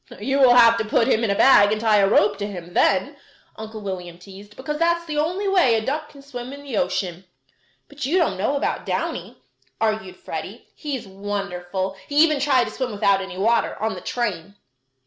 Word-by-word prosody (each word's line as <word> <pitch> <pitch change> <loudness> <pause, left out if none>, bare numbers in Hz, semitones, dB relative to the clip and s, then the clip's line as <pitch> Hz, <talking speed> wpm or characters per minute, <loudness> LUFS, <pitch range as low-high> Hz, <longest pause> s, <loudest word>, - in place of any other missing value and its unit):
"You 270 +6 -1
will 250 -3 +6
have 230 -1 +6
to - - 0
put 225 +1 +1
him 225 - +2
in 225 - +1
a 200 - +1
bag 205 -4 +6
and 215 - 0
tie 220 -1 +3
a 195 -1 +3
rope 205 -1 +3
to 205 - -3
him 175 -3 -9
then," 230 +13 +1 0.4
Uncle 220 0 -8
William 180 -4 -6
teased, 200 +3 -14
"because 300 +3 -5
that's 340 0 +1
the 300 -2 -2
only 360 +7 -1
way 360 -12 +4
a 220 -1 -1
duck 300 +2 -3
can 280 -1 -15
swim 250 -2 -8
in 280 +1 -10
the 275 -5 -6
ocean." 185 -3 -2 0.6
"But 285 -1 -9
you 340 +6 +1
don't 330 - +1
know 270 +8 0
about - - -2
Downy," - - -4 0.4
argued 215 -4 -1
Freddie. - - -8
"He's 285 -6 -5
wonderful! 190 -1 -4
He 285 - -6
even 305 -3 +2
tried 265 -3 +3
to 215 - -5
swim 255 +1 -3
without 200 -1 +2
any 190 -1 -7
water, 230 +4 +1
on 220 +1 -1
the - - -8
train." 200 -6 -3
220 Hz, 205 wpm, -22 LUFS, 200-275 Hz, 0.6 s, will